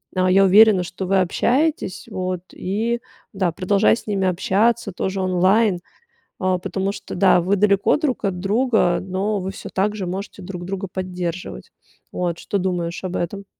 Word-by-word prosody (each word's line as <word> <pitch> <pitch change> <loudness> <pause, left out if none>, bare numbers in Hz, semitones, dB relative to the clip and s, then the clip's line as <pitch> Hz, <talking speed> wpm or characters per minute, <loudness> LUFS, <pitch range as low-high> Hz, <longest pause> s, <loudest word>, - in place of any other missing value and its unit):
А, 185 0 +2
я 195 +1 +6
уверена, 200 0 +6
что 180 +1 -6
вы 195 +1 +3
общаетесь. 255 - 0
Вот 185 -1 -3
и 225 +5 -2 0.3
да, 190 -3 0
продолжай 195 +6 +2
с - - -12
ними 195 -2 0
общаться 200 +4 +1
тоже 190 +2 -3
онлайн, 185 +2 +2 0.6
а, 185 -1 +1
потому 190 +2 -2
что, - - -8
да, 185 0 +5
вы 185 +4 +1
далеко 200 +3 +3
друг 280 -7 -1
от 185 -2 -1
друга, 210 -2 +2
но 195 +3 -2
вы 190 +1 -4
всё - - -9
так 205 +2 0
же 195 -4 -4
можете 195 +2 -6
друг 180 -1 -7
друга 195 +1 -4
поддерживать. 180 -1 -5 0.4
Вот 175 -2 -2
что 200 - -2
думаешь 180 -2 -2
об 185 -1 -4
этом? 200 +4 -3
190 Hz, 170 wpm, -21 LUFS, 180-205 Hz, 0.6 s, я